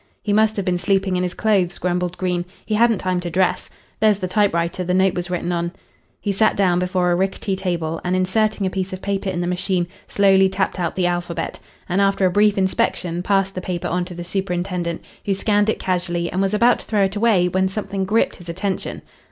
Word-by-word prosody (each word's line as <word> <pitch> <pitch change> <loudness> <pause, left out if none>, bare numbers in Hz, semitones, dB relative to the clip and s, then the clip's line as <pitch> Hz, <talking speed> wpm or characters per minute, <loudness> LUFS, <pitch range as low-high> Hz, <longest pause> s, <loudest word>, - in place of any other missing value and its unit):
"He 205 - 0
must 220 +1 +3
have 200 - -2
been 180 -2 0
sleeping 190 +1 +1
in 180 - 0
his 180 0 -2
clothes," 195 -5 +1
grumbled 180 0 -1
Green. 180 -2 -1 0.2
"He 215 - -2
hadn't 230 0 +4
time 185 -1 -1
to 175 -1 -4
dress. 180 +1 0 0.3
There's 215 -2 +4
the 185 -2 -3
typewriter 180 -3 +1
the 180 +1 0
note 190 0 +3
was 175 0 -3
written 180 0 -2
on." 170 0 -2 0.5
He 205 - -1
sat 215 +3 +2
down 180 -3 +2
before 180 -1 +1
a - - +3
rickety 190 +1 -1
table 170 -4 -2
and, 180 +1 0
inserting 205 +3 +1
a 185 - -1
piece 190 0 -3
of 185 - -6
paper 200 -1 -1
in 175 -2 -2
the - - -1
machine, 180 0 0 0.2
slowly 195 -1 +4
tapped 190 0 -1
out 175 - -1
the 185 -1 +1
alphabet, 175 -1 -2 0.3
and 185 +2 +1
after 195 -1 +2
a 185 - +3
brief 205 +2 +3
inspection 180 -2 0
passed 195 0 +1
the 185 - -4
paper 180 -1 -3
on 180 +1 0
to 180 -1 -8
the 175 - -6
superintendent, 180 -2 -2 0.2
who 195 - +1
scanned 205 +1 +2
it - - +1
casually, 175 -2 -1
and 190 - 0
was 195 +1 +1
about 235 +3 +4
to - - -10
throw 210 -2 +1
it 195 +1 0
away 205 -5 +3
when 190 +1 +1
something 195 0 -3
gripped 215 +4 +1
his 175 -2 -11
attention. 190 +3 -3
185 Hz, 225 wpm, -21 LUFS, 180-200 Hz, 0.5 s, hadn't